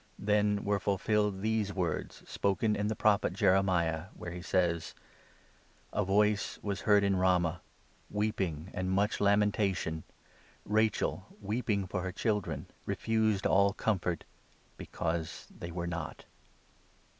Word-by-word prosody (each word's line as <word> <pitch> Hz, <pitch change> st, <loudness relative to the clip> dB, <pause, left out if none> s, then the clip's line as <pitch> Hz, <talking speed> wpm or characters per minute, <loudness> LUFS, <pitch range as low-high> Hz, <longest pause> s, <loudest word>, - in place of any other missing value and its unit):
Then 105 Hz, 0 st, +2 dB
were 100 Hz, 0 st, +1 dB
ful 100 Hz, +1 st, 0 dB
17 -, -, -18 dB
filled 105 Hz, -3 st, +2 dB
these 110 Hz, -2 st, +1 dB
words 90 Hz, -5 st, -2 dB
spoken 105 Hz, +2 st, +1 dB
in 105 Hz, 0 st, -1 dB
the 110 Hz, -, -1 dB
Prophet 105 Hz, -4 st, +2 dB
Jeremiah, 90 Hz, -4 st, +2 dB
where 85 Hz, -, -7 dB
he 90 Hz, 0 st, -6 dB
says 85 Hz, -2 st, 0 dB, 0.5 s
— -, -, -32 dB
'A -, -, +1 dB
voice 105 Hz, +1 st, +2 dB
was 100 Hz, -2 st, -2 dB
heard 105 Hz, -1 st, +4 dB
in 100 Hz, -1 st, +2 dB
Ramah, 90 Hz, -2 st, +2 dB, 0.5 s
18 -, -, -7 dB
Weeping" 95 Hz, -6 st, -1 dB
and 95 Hz, 0 st, -2 dB
much 100 Hz, +2 st, +1 dB
lamentation; 100 Hz, -5 st, +2 dB, 0.6 s
Rachel, 105 Hz, -2 st, +1 dB
weeping 105 Hz, -1 st, -1 dB
for 90 Hz, 0 st, -3 dB
her 95 Hz, +1 st, -3 dB
children, 90 Hz, -, -1 dB, 0.2 s
Refused 110 Hz, 0 st, +1 dB
all 100 Hz, 0 st, +4 dB
comfort 90 Hz, -6 st, -1 dB, 0.5 s
because 80 Hz, -1 st, -3 dB
they 85 Hz, -, -7 dB
were 85 Hz, 0 st, -3 dB
not.' 85 Hz, -2 st, -5 dB
100 Hz, 135 wpm, -31 LUFS, 90-105 Hz, 0.6 s, heard